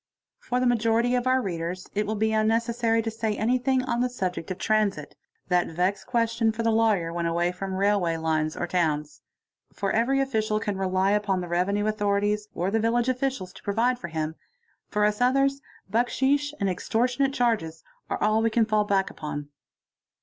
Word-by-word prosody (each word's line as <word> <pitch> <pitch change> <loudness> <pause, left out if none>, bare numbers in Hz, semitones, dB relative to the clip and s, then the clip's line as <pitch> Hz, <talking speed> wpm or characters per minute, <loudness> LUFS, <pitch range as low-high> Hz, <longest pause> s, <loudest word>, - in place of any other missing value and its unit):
For 250 - -2
the 255 - +1
majority 235 0 +2
of 250 0 0
our 260 0 +3
readers 175 -1 -4
it 210 0 -1
will 215 - -1
be 220 +1 +1
unnecessary 225 +1 +1
to 225 - -2
say 220 -1 -2
anything 255 +3 +1
'on 240 -1 -1
the 250 - +1
subject 185 -8 -4
of 185 - -3
transit, 205 -8 0 0.3
that 180 -1 +2
vexed 180 +4 -1
question 230 -2 +1
for 225 +1 -4
the 230 - +2
lawyer 215 -7 +2
when 170 0 -1
away 170 +1 +1
fron: 190 +1 -5
railway 190 -4 +1
lines 155 -1 -1
or - - -1
towns. 155 -4 -1 0.6
Every 230 +7 +1
official 220 -5 0
can 205 -1 -2
rely 190 0 +1
upon 205 -2 +1
the 175 - -5
revenue 190 +4 0
f 215 0 -1
thorities 205 0 0
or 180 +3 -1
the 225 - +2
village 235 +2 +1
officials 255 -8 -2
to 190 - -13
provide 240 +5 +1
for 170 - -6
him; 160 -1 -3 0.5
for 210 -1 +1
us 210 +2 0
others, 275 +2 +2 0.3
0 235 +3 +3
cksheesh 285 +3 +1
and 200 - +1
extortionate 245 +8 0
charges 215 -10 0 0.3
are - - -1
all 215 +1 +3
we 225 - +2
can 225 0 +2
fall 215 -1 +1
back 195 -2 +1
upon. 145 -1 -6
215 Hz, 185 wpm, -26 LUFS, 185-235 Hz, 0.6 s, our